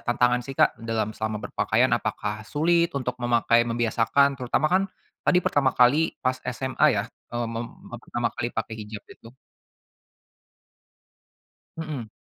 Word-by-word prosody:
tantangan 125 0 +2
sih, 135 0 -8
Kak, - - +3
dalam 115 -2 -2
selama 110 0 -3
berpakaian? - - +1
Apakah 105 +1 -1
sulit 170 +3 +2
untuk 125 -2 -1
memakai, 120 -1 +3
membiasakan? 120 +4 +2
Terutama 125 +4 +1
kan 190 +1 +4 0.4
tadi 180 - +4
pertama 135 -2 +2
kali 140 +7 +4
pas 130 0 +2
SMA 130 +3 +1
ya, 105 -7 +1 0.3
eee, 120 0 -1
mem 115 +1 -3 0.3
eee, 120 - -5
pertama 120 -1 -2
kali 120 - -2
pakai 115 - -4
hijab 105 -1 -8
itu. 115 - -15 2.5
Mhm. 150 -9 -5
120 Hz, 135 wpm, -25 LUFS, 115-140 Hz, 2.5 s, kan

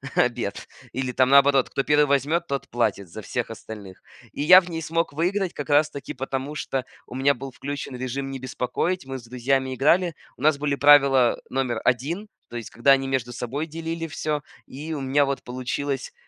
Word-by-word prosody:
обед. 120 -5 0 0.2
Или 130 0 -2
там 130 +1 +3
наоборот: 140 -1 +5
кто 135 - -1
первый 150 +1 +4
возьмет, 145 +5 +1
тот 140 -1 -3
платит 110 -5 -1
за 110 +6 -8
всех 120 +3 -3
остальных. 105 -4 -10 0.3
И - - -5
я 180 +5 +9
в 180 - -10
ней 165 -1 -4
смог 165 +1 -1
выиграть 180 +5 -1
как 145 - -6
раз-таки 145 -1 +1
потому, 135 +2 -4
что 135 -3 -3 0.2
у - - -9
меня 135 +2 +3
был 135 +1 -8
включен 140 -1 -6
режим 135 +2 -4
"Не 135 - -5
беспокоить", 130 +7 -2
мы 135 0 -5
с 120 - -15
друзьями 130 +2 0
играли, 165 +5 +3 0.2
у - - -15
нас 155 -1 +4
были 145 0 0
правила 140 -4 +6
номер 130 -3 -1
1, 150 - 0 0.2
то - - -10
есть 120 -2 -5
когда 120 +4 +3
они 135 0 +4
между 125 -2 -1
собой 130 +6 -4
делили 165 +1 -4
всё, 150 -1 -3 0.2
и 150 +4 -7
у 145 - -4
меня 135 +2 +2
вот 140 0 -3
получилось 130 +2 -3
135 Hz, 190 wpm, -24 LUFS, 125-150 Hz, 0.3 s, я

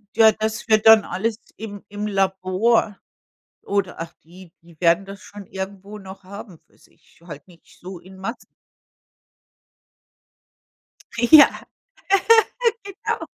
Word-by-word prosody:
Ja, 220 -1 +6
das 220 +1 -4
wird 215 0 +3
dann 220 -2 +7
alles 215 +4 -3 0.2
im 205 -2 -9
im 205 +1 -6
Labor 195 +2 0 0.6
oder 200 -2 -2
ach, 165 0 -7
die 175 +1 -16
die 165 -2 -20
werden 170 +3 +3
das 200 +1 -11
schon 205 -2 -12
irgendwo 195 +2 -8
noch 190 -1 -12
haben 195 -3 -11
für - - -30
sich, 160 - -27
halt 150 0 -11
nicht 170 -2 -21
so 185 0 -9
in 190 +2 -16
Massen. 230 +6 -8 2.6
Ja, 285 +6 +7 1.4
genau. 395 -1 -5
195 Hz, 120 wpm, -21 LUFS, 185-215 Hz, 2.6 s, dann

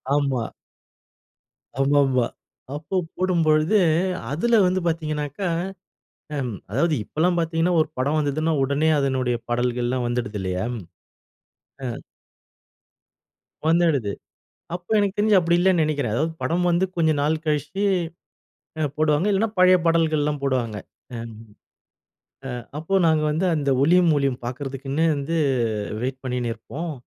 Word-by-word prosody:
ஆமா. 135 -5 0 1.3
ஆமா 140 +1 +3
ஆமா. 130 -3 +2 0.5
அப்போ 155 +6 -5 0.2
போடும்பொழுது 170 0 +3 0.5
அதில 225 +10 +3
வந்து 185 +1 +2
பார்த்தீங்கன்னாக்கா, 155 +1 -2 0.9
அம் 125 -4 -2 0.2
அதாவது 150 +9 +1
இப்போ - - -32
எல்லாம் 175 +1 +3
பார்த்தீங்கன்னா 165 +1 +1
ஒரு 155 - +1
படம் 145 +4 +1
வந்ததுன்னா 155 +2 0
உடனே 140 +4 +1
அதனுடைய 130 -3 0
பாடல்கள் 120 0 0
எல்லாம் 125 -1 -1
வந்துடுது 120 -4 -2
இல்லயா? 95 0 -2 1.2
ம். 120 -2 -5 1.7
வந்துடுது. 160 -10 +2 0.6
அப்போ 180 +3 -9
எனக்கு 200 -1 +1
தெரிஞ்சு 210 -1 +4
அப்படி 170 0 +2
இல்லன்னு 180 -2 +3
நினைக்கிறன். 145 -8 -1
அதாவது 155 +6 0
படம் 175 +2 +1
வந்து 175 +2 +2
கொஞ்சம் 160 -3 +2
நாள் 155 +2 0
கழிச்சு 150 +6 -1 1.2
போடுவாங்க. 155 +3 +2
இல்லன்னா 205 +3 +2
பழைய 185 0 +7
பாடல்கள் 165 -2 +2
எல்லாம் 145 -1 -1
போடுவாங்க. 125 -5 -1 0.4
அ - - -4 1.6
அப்ப 165 +6 0
நாங்க 155 -1 +3
வந்து 160 +5 0
அந்த 145 -2 -1
ஒளியும் 175 +3 +5
ஒலியும் 135 -3 0
பார்க்கிறதுக்குன்னே 135 +4 -2
வந்து 145 +4 -3 0.7
வெயிட் 130 +1 -3
பண்ணின்னு 125 -2 -2
இருப்போம். 155 +9 -6
150 Hz, 120 wpm, -23 LUFS, 130-170 Hz, 1.7 s, பழைய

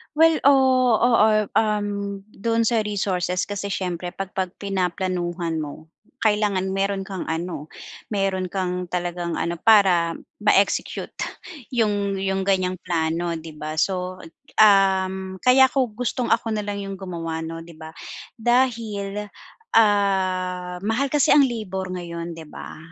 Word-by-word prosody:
Well, 325 +1 +5
oo 260 -3 +5
oo, 215 -3 +4
um, 205 -2 -1
doon 230 +3 -1
sa 225 -3 +1
resources 185 -3 -1
kasi 200 0 -4
siyempre 180 -1 -3
pag 195 -1 -5
pag 185 -1 -1
pinaplanuhan 180 -3 -2
mo, 155 +1 -7 0.3
kailangan 205 -3 +1
meron 195 0 -1
kang 190 -1 -5
ano, 160 -2 -4 0.5
meron 195 -2 0
kang 180 -1 -2
talagang 175 -1 -3
ano 170 +1 -2
para 180 -5 +4 0.2
ma-execute - - +1 0.6
yung 205 -4 +1
yung 190 0 -1
ganyang 185 -2 +1
plano, 170 -1 -1
'di 160 -1 -8
ba? 155 +1 -5
So 185 +2 -1 0.4
um, 190 -2 +3
kaya 260 +1 +6
kung 250 -6 0
gustong 245 0 -1
ako 225 - +1
na 210 - -1
lang 205 0 -4
yung 195 - -5
gumawa 170 -4 -5
'no, 165 0 -6
di 170 - -13
ba 160 0 -10 0.5
dahil, 225 -4 0 0.6
ah, 185 -4 +2
mahal 240 +6 0
kasi 290 0 +4
ang 295 - +7
labor 190 -5 -4
ngayon, 170 -2 -5
di 160 - -9
ba? 150 - -9
190 Hz, 135 wpm, -23 LUFS, 175-210 Hz, 0.6 s, ang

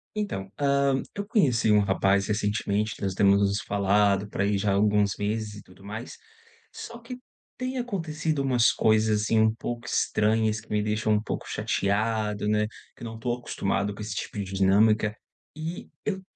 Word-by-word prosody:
Então, 100 - -3
hã, 140 -1 +2
eu 200 - -3
conheci 135 - +2
um 105 - +6
rapaz 100 0 +2
recentemente, 105 0 -1
que - - -16
nós 95 -1 -1
temos 100 0 +4
nos 100 0 +1
falado 100 0 +2
pra 100 - -1
ai 100 0 +1
já 100 +1 0
há - - +2
alguns 105 -1 +2
meses 105 0 -2
e 105 - -9
tudo 95 +1 -18
mais. 110 +4 -7 0.5
Só 235 0 -9
que 245 +2 -9 0.4
tem 255 +1 -3
acontecido 160 - -2
umas 125 -4 +4
coisas, 110 -1 +3
assim, 110 +1 +2
um 110 0 +4
pouco 120 +1 -5
estranhas, 110 -1 +1
que 110 - -18
me 105 0 0
deixam 110 0 +1
um 105 - +2
pouco 110 - -5
chateado, 105 +1 -1
né, 105 0 +2 0.3
que - - -12
não 115 0 -6
tô 120 +2 -1
acostumado 100 -4 -2
com 105 - -9
esse 105 -1 -5
tipo 105 - -5
de 100 - -1
dinâmica. 105 +3 +3 0.4
E 160 +3 -6 0.2
eu 190 -2 -2
105 Hz, 180 wpm, -26 LUFS, 100-120 Hz, 0.5 s, um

